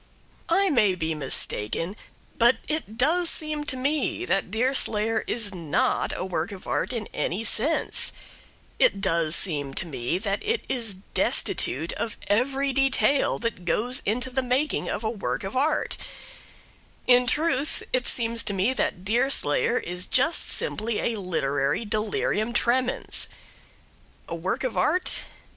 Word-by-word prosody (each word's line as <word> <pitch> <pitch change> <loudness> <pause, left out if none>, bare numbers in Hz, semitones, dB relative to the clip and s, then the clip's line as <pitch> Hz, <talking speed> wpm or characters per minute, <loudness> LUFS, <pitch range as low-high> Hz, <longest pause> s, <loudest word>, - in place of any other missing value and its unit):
I 380 +2 +3
may 210 -9 +3
be 160 -2 -2
mistaken, 150 - 0 0.4
but 240 +2 +5
it 300 -8 -3
does 330 +7 +4
seem 305 -1 +1
to 260 - -4
me 290 +6 -1
that 195 - 0
Deerslayer 225 -1 +1
is 220 -4 0
not 165 -5 0
a - - -3
work 175 -2 -3
of 195 -2 -10
art - - -1
in 230 -4 -3
any 190 +7 -2
sense; 240 +8 +2 0.7
it - - +4
does 170 -4 +1
seem 145 -6 0
to - - -1
me 135 0 -2
that 200 0 -2
it 450 +2 -1
is 230 -6 -1 0.2
destitute 155 +6 +1
of 230 - -4
every 270 +6 0
detail 270 +1 +2
that 210 -6 -3
goes 240 +9 0
to 245 +5 -2
the 265 +1 0
making 260 +4 -1
of 220 - -3
a 220 - 0
work 215 -3 -3
of 195 +4 -6
art; 300 +3 0 1.1
in 245 0 +5
truth, 290 0 0
it 255 -1 +1
seems 230 -1 +3
to 205 - 0
me 195 +7 +1
that 185 -7 -2
Deerslayer 270 - +2
is 180 +1 -2
just 295 +6 +3
simply 215 0 0
a 220 - -5
literary 145 -1 -1
delirium 215 +1 -1
tremens. 250 +1 0 1.0
A - - -6
work 170 +8 -3
of 255 - -2
art? 360 +4 +1
230 Hz, 145 wpm, -25 LUFS, 190-265 Hz, 1.1 s, but